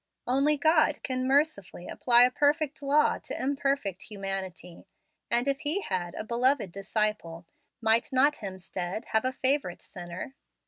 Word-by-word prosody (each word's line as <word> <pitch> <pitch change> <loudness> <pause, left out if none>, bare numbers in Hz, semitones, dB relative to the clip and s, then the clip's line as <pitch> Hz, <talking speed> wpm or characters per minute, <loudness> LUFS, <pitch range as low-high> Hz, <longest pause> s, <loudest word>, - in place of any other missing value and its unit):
Only 275 +4 +2
God 310 0 +3
can 255 -1 -2
mercifully 265 - 0
apply 240 -1 +4
a 250 - +4
perfect 295 +2 +1
law 285 +2 +2
to - - -7
imperfect 275 -8 -1
humanity, 190 -4 -6 0.4
and 240 +3 +1
if 275 0 0
He 315 +6 0
had 180 - -3
a - - -4
"beloved 240 -2 +1
disciple," 195 -3 -2 0.4
might 225 +1 +2
not 280 +3 +3
Hemstead 190 +1 -5
have 220 +2 +1
a 255 - +1
favorite 260 -8 -1
sinner? 175 +7 -8
245 Hz, 140 wpm, -28 LUFS, 195-280 Hz, 0.4 s, apply